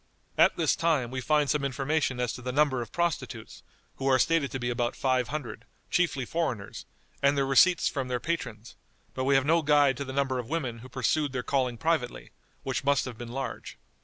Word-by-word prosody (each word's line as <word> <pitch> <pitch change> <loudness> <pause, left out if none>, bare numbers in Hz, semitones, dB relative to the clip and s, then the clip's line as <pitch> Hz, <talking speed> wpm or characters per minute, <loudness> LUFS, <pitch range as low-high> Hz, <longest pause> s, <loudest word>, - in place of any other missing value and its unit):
At - - +4
this - - +2
time 155 -8 +1
we 130 0 -3
find 150 +2 +2
some 150 0 0
information 140 0 -1
as 125 -2 -1
to - - -8
the 125 +1 -3
number 135 -2 +2
of 115 - -7
prostitutes, 135 -10 -3 0.4
who 135 - -2
are 130 -1 +5
stated 150 +1 +2
to 130 - -4
be 120 0 -1
about 120 0 -1
five 130 -2 +1
hundred, 135 -7 -5 0.3
chiefly 160 -7 +1
foreigners, 125 -10 -3 0.3
and 140 +1 +3
their 135 - +2
receipts 160 +6 +4
from 135 -2 -2
their 125 -1 -1
patrons, 125 -10 -4 0.4
but 130 - -2
we 140 0 +3
have 135 0 +3
no 165 +3 +3
guide 145 -3 +4
to 140 - -3
the 130 - -7
number 135 -1 0
of 120 - -6
women 130 -8 -2
who 130 +3 -12
pursued 135 +3 0
their 125 -1 -2
calling 125 -3 0
privately, 160 -4 -1 0.3
which 135 +1 -2
must 140 0 +2
have 125 -3 -6
been 120 -1 -7
large. 135 +1 -5
135 Hz, 210 wpm, -28 LUFS, 125-150 Hz, 0.4 s, are